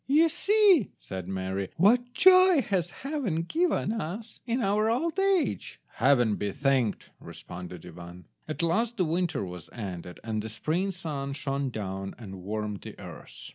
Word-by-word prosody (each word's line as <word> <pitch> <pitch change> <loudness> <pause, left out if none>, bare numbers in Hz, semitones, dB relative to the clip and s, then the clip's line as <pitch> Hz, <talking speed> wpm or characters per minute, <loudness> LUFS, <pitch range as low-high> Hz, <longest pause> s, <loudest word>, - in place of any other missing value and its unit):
"You 310 +5 +5
see," 390 - +4
said 95 -2 -6
Mary, 95 0 -3
"what 245 +7 +4
joy 370 -4 +7
has 185 -5 0
Heaven 260 - -2
given 325 - +1
us 215 +2 -5
in 240 +2 0
our 210 +2 +2
old 320 +9 0
age." 390 -4 +1
"Heaven 120 -7 +3
be 100 -1 -2
thanked," 135 -5 0
responded 90 -1 -9
Ivan. 90 0 -11 0.2
At 155 +2 -3
last 225 +8 +1
the 185 - +2
winter 165 - -1
was 90 -3 -9
ended, 90 -5 -7
and 110 -1 -2
the 110 - -6
spring 165 - -1
sun 150 -7 -4
shone 140 -1 -2
down 95 -4 -5
and 95 -5 -9
warmed 105 +1 -4
the - - -10
earth. - - -10
155 Hz, 155 wpm, -28 LUFS, -, 0.2 s, joy